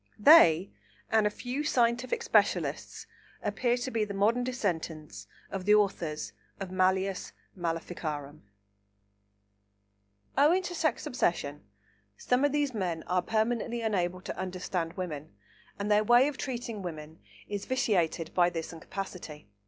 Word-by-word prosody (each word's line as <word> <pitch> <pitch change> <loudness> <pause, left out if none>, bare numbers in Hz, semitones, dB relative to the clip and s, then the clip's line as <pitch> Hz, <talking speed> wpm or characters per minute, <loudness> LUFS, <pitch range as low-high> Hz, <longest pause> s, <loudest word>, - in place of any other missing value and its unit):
They 205 - +7 0.4
and 220 -1 +4
a - - +1
few 250 +7 -4
scientific 250 - +1
specialists - - +1 0.4
appear 245 -1 +1
to 250 +1 -4
be 225 -3 +1
the 205 -1 -4
modern 225 +5 +2
descendants 170 -11 -3 0.2
of 190 -2 -4
the 210 +1 +6
authors 175 -7 0 0.3
of 195 -2 -5
Malleus 190 0 0 0.2
Maleficarum. 160 -4 -4 1.9
Owing 315 +7 +4
to 355 - -4
sex 315 -6 0
obsession, 150 - -1 0.5
some 250 +2 +1
of 290 - +3
these 290 -2 0
men 175 -6 -2
are 180 0 +1
permanently 230 +3 -1
unable 185 -5 -1
to - - -6
understand 180 -2 -3
women, 155 - -6 0.4
and 205 +1 -2
their 210 +1 +5
way 240 +4 +6
of 295 - -3
treating 240 -6 -4
women 160 -3 -7 0.3
is 205 -1 -4
vitiated 175 -10 0
by 175 -1 +4
this 165 -1 -5
incapacity. 165 - -7
195 Hz, 130 wpm, -29 LUFS, 170-240 Hz, 1.9 s, They